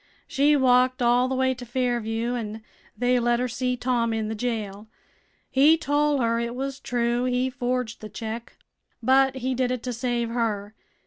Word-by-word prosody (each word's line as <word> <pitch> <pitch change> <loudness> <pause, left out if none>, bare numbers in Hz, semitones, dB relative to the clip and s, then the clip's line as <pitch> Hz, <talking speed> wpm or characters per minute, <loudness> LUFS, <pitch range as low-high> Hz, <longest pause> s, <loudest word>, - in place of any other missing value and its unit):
She 290 +2 +3
walked 255 -1 +3
all 245 +1 +4
the 260 - -2
way 260 0 +2
to 250 -1 -9
Fairview, 240 -1 -1
an' 220 -2 -5 0.3
they 245 0 +2
let 240 0 +1
her 250 - 0
see 250 +1 -2
Tom 240 -2 0
in 220 -1 -2
the - - -2
jail. 215 -3 -4 0.6
He 295 +5 +5
tol' 290 -2 +1
her 230 0 +1
it 235 +1 -3
was 270 +1 -4
true 240 0 0
he 255 +1 0
forged 250 -2 -2
th' 215 - -8
check, 225 +1 -6 0.5
but 265 0 +4
he 260 0 -2
did 255 0 0
it 250 -2 -3
to 250 - -3
save 240 -1 -1
her. 215 -3 -2
245 Hz, 180 wpm, -25 LUFS, 230-255 Hz, 0.6 s, He